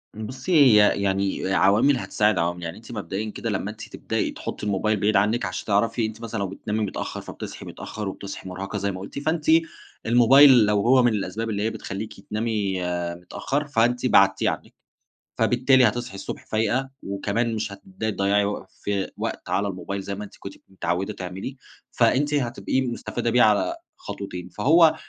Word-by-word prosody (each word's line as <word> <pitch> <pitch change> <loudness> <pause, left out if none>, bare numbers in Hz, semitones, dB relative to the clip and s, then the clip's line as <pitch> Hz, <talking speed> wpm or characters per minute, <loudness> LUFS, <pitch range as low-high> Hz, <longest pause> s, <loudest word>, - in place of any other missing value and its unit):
بُصي، 125 - -6
هي 110 -10 +6
يعني 95 -1 0
عوامِل 110 +10 +4
هتساعد 105 -4 +1
عوامِل، 85 +1 -1
يعني 85 +1 -5
أنتِ 115 +2 -12
مبدئيًا 105 0 -4
كده - - -4
لما - - -2
أنتِ - - -10
تبدئي - - -2
تحطّي - - -6
الموبايل 105 +1 0
بعيد 105 +2 +2
عنِّك 105 +3 +2
عشان 90 - -4
تعرفي 110 +3 +1
أنتِ 110 +1 -6
مثلًا 115 -1 -4
لو 100 - -1
بتنامي 105 +3 -4
متأخَّر 100 - -5
فبتصحي - - -8
متأّخر 105 -2 -6
وبتصحي 95 0 -7
مُرهَقة 95 +3 -5
زي 100 0 -1
ما 95 - -7
قلتِ، 100 +8 -7
فأنتِ 155 +2 -1 0.6
الموبايل 120 +1 +7
لو 105 -1 +2
هو 125 +3 +5
من 120 -2 +3
الأسباب 105 +2 -3
اللي 105 -1 -1
هي 110 - +1
بتخلّيكي 105 -2 -7
تنامي 105 -4 -1 0.3
متأخَّر، 135 +11 -3
فأنتِ 120 -2 +1
بعدتيه - - +4
عنِّك، - - -6 0.6
فبالتالي 130 +1 +4
هتصحي 120 +1 -3
الصبح 100 - -7
فايقة 120 +5 0
وكمان 105 +4 -1
مش 110 -1 -3
هتبدئي 100 +2 -5
تضيعي 100 0 +2
وق 105 - -3
في 100 -2 -3
وقت - - -4
على 100 +2 +1
الموبايل 100 +1 -4
زي 100 +1 -5
ما 105 - -6
أنتِ 105 - -11
كنتِ 100 - -8 0.2
متعوِّدة 95 +2 -2
تعملي، 95 +7 -6 0.3
فأنتِ 145 +2 +2
هتبقي 130 -1 0
مُستفادة 120 -1 -3
بيه 120 +1 +4
على 105 -5 +3 0.2
خطوتين، 90 -3 -7
فهو 160 - +5
105 Hz, 170 wpm, -24 LUFS, 100-120 Hz, 0.6 s, الموبايل